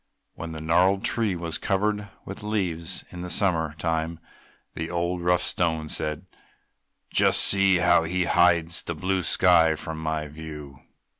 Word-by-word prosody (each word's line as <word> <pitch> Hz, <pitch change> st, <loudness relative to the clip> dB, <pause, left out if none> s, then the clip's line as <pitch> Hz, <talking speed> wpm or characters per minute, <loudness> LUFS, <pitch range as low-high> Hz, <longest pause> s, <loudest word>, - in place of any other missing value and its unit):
When 85 Hz, -, -7 dB
the 80 Hz, -1 st, -7 dB
gnarled 90 Hz, +5 st, +2 dB
tree 110 Hz, -6 st, +1 dB
was 85 Hz, -2 st, -4 dB
covered 105 Hz, +1 st, -1 dB, 0.2 s
with 95 Hz, -, -8 dB
leaves 95 Hz, -6 st, -3 dB
in 90 Hz, -, -8 dB
the 90 Hz, -, -6 dB
summer 80 Hz, -5 st, 0 dB
time, 80 Hz, +1 st, -2 dB, 0.5 s
the 80 Hz, 0 st, -5 dB
old, 85 Hz, +1 st, -2 dB
rough 90 Hz, 0 st, +2 dB
Stone 80 Hz, -4 st, -1 dB
said, 75 Hz, 0 st, -4 dB, 0.9 s
"Just -, -, +4 dB
see 95 Hz, -1 st, +4 dB
how 85 Hz, -1 st, +3 dB
he 90 Hz, +2 st, 0 dB
hides 85 Hz, -1 st, +2 dB
the 85 Hz, -, -5 dB
blue 95 Hz, +4 st, -1 dB
sky 80 Hz, -3 st, +4 dB
from 80 Hz, 0 st, -6 dB
my 80 Hz, -1 st, -2 dB
view!" 75 Hz, -2 st, -10 dB
85 Hz, 150 wpm, -25 LUFS, 80-90 Hz, 0.9 s, Just